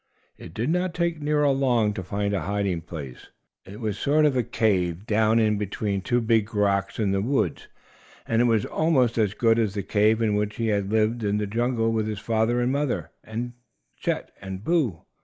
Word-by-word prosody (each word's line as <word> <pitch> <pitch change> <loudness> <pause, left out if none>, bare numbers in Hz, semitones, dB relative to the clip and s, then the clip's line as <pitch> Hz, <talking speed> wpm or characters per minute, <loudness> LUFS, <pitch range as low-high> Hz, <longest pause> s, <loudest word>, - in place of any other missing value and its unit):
It 80 - -12
did 120 +8 -1
not 180 0 0
take 170 -3 -1
Nero 150 -1 +2
long 120 -6 +2
to 95 - -4
find 100 +2 -2
a 95 - 0
hiding 100 -2 -1
place. 75 -6 -9 0.4
It 100 +2 -10
was 110 -3 -2
a - - -8
sort 150 +2 +3
of 130 -6 +1
cave 95 -4 +1
down 110 +1 +2
in 105 -2 +2
between 100 -1 -2
two 120 +5 +1
big 115 -1 +1
rocks 100 -1 +1
in 105 -3 +1
the 95 0 +1
woods; 135 +6 -1 0.6
and 115 +1 +2
it - - +4
was 115 -4 +2
almost 130 -8 +1
as 105 -1 +1
good 115 +1 +3
as 105 -3 0
the 100 - -2
cave 110 +3 +2
in 110 -2 +1
which 105 0 -1
he 115 -1 -1
had 100 -1 0
lived 110 +1 +1
in 105 0 +1
the 105 - -1
jungle 115 +2 0
with 110 -1 0
his 105 -1 -3
father 115 +3 +1
and 120 +1 +1
mother 135 - -1
and 120 +2 -5 0.4
Chet - - -3
and 95 0 -7
Boo. 140 - 0
110 Hz, 205 wpm, -25 LUFS, 100-120 Hz, 0.6 s, it